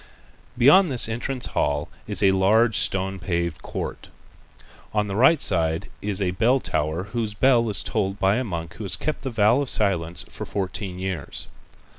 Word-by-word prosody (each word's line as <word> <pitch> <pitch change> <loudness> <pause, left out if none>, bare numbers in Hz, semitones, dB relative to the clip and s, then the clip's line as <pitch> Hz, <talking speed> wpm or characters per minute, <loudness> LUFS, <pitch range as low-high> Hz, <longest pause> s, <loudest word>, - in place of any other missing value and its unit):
Beyond 155 +9 +6
this 125 -4 +5
entrance 120 +3 -3
hall 75 +1 -1 0.2
is - - 0
a 95 - +6
large 105 +4 +3
stone 95 0 0
paved 85 -3 -2
court. - - -6 0.9
On 105 0 +2
the 100 -1 -4
right 135 +8 +5
side 80 -6 0
is 100 -1 0
a 95 -3 0
bell 120 +8 +2
tower 80 -4 -2
whose 110 -3 -2
bell 120 -2 +3
is 100 - 0
tolled 100 -2 -2
by 95 +2 +2
a 130 - -1
monk 85 -7 -5
who 110 - -6
has 95 -3 +2
kept 155 +11 -3
the 135 - -4
vow 115 +3 +3
of 140 - -2
silence 90 -5 0
for - - -8
fourteen 95 -1 -4
years. 90 -5 -4
100 Hz, 175 wpm, -23 LUFS, 90-120 Hz, 0.9 s, Beyond